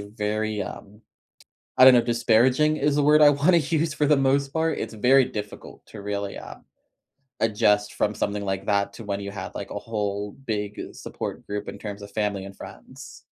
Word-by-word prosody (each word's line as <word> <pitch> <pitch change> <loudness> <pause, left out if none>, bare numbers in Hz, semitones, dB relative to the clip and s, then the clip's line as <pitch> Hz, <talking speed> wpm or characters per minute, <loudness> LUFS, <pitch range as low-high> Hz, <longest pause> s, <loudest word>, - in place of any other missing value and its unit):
very, 105 0 -3
um, 105 +2 -10 0.8
I 130 - +8
don't 130 - +9
know, 120 - +6
disparaging 120 +5 +2
is 145 0 +1
the 145 - +2
word 150 +1 +5
I 150 -1 +8
wanna 145 +5 +3
use 160 0 0
for 150 -1 +1
the 150 - +4
most 135 0 +1
part, 160 0 0
it's - - -5
very 130 +4 +4
difficult 105 -3 -8
to 105 - -11
really, 100 0 -4
um, - - -11 0.8
adjust 105 -1 +2
from 105 - 0
something 100 0 -2
like 95 0 -3
that 100 -1 0
to 115 - -10
when 100 -1 -3
you 100 0 -6
have, 95 -2 -7
like, - - -6
a - - -4
whole 105 -2 -3
big 105 -3 -4
support - - -7
group 105 0 -5
in - - -7
terms 105 -1 -7
of 100 - -9
family 100 -2 -2
and 100 0 -10
friends. - - -12
110 Hz, 195 wpm, -24 LUFS, 100-135 Hz, 0.8 s, don't